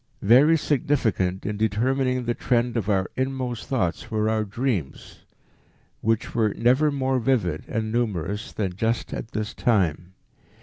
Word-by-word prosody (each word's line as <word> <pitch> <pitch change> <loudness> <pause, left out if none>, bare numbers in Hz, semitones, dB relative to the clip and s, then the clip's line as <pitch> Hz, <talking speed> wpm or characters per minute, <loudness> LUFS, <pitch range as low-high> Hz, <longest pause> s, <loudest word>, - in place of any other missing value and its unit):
"Very 135 +10 +6
significant 120 - 0
in 105 0 -2
determining 125 +4 0
the 120 - 0
trend 120 0 0
of 110 -3 -1
our 95 -2 +1
inmost 130 -3 -3
thoughts 95 - -1
were 110 0 0
our 110 -1 +1
dreams, 105 - -3 0.8
which 115 0 0
were 110 -3 +1
never 130 +6 +3
more 130 -2 0
vivid 110 - 0
and 110 0 -2
numerous 105 -4 -2
than 95 -4 -2
just 115 +4 -1
at - - -5
this 110 -1 -4
time. 90 -6 0
115 Hz, 140 wpm, -24 LUFS, 100-130 Hz, 0.8 s, Very